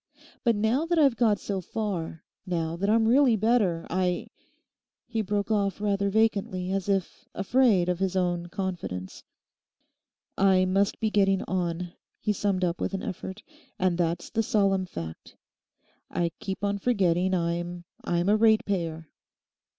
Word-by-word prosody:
But 235 -2 +3
now 225 +10 +1
that 345 0 +1
I've 280 -6 +5
got 220 -4 +2
so 195 -2 -3
far, 180 -5 -4 0.2
now 165 -3 -2
that 200 +4 -1
I'm 225 +1 +4
really 255 0 +5
better, 215 -6 +1
I—' 180 0 -1 0.8
He 225 -2 -2
broke 205 +1 -2
off 200 -2 +1
rather 200 -1 0
vacantly, 200 -3 +1
as 195 0 -2
if 195 -3 -2
afraid 200 -3 +3
of 180 -1 0
his 190 -1 -1
own 175 -2 0
confidence. 175 - -5 1.2
'I 190 -1 +4
must 195 +2 +1
be 220 -1 0
getting 195 -2 +3
on,' 175 -1 -2 0.3
he 210 - 0
summed 195 -2 0
up 175 -1 -1
with - - -1
an 190 - -4
effort, 190 +2 -6 0.3
'and 185 -1 +1
that's 170 0 -1
the 225 - +1
solemn 195 -3 +1
fact. 80 - -8 0.7
I 170 -1 -1
keep 190 +1 -5
on 200 0 0
forgetting 190 -5 +2
I'm—I'm 175 0 -2
a 205 - +5
ratepayer! 190 -7 +1
190 Hz, 145 wpm, -27 LUFS, 175-210 Hz, 1.2 s, I've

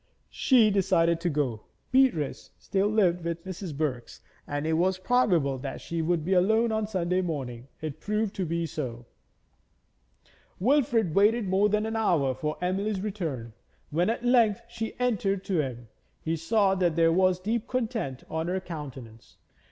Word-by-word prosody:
She 235 -5 +4
decided 175 -4 +2
to 175 - 0
go. 135 -8 -2 0.3
Beatrice 255 - +2
still 195 0 0
lived 185 -5 +2
with 170 +1 -4
Mrs. 185 -5 -6
Birks, 130 -6 -3 0.3
and 145 +1 -3
it 160 - +1
was 185 +3 +2
probable 185 - +2
that 135 +1 -5
she 165 -1 -3
would 160 -1 0
be 190 - +1
alone 220 +5 +3
on 220 -1 -1
Sunday 185 -3 0
morning. 130 -8 -4
It 155 -1 -5
proved 210 +2 -1
to 190 - -1
be 170 +1 -1
so. 125 -6 -5 1.5
Wilfrid 235 - +2
waited 210 +3 +3
more 195 +3 +3
than 210 +1 +1
an 220 0 -3
hour 165 -12 +2
for 150 +4 -3
Emily's 195 +3 -1
return. 160 - -4 0.4
When 175 +6 +1
at 235 +1 -2
length 235 -5 +3
she 230 -1 -6
entered 200 -6 0
to 180 -5 +1
him, 120 -4 -6 0.3
he 165 +1 -2
saw 190 +5 +2
that 180 -4 +1
there 165 -1 +4
was 185 0 +3
deep 220 +4 -2
content 225 - -2
on 160 +1 -3
her 185 +2 0
countenance. 135 -10 -9
180 Hz, 160 wpm, -27 LUFS, 155-210 Hz, 1.5 s, She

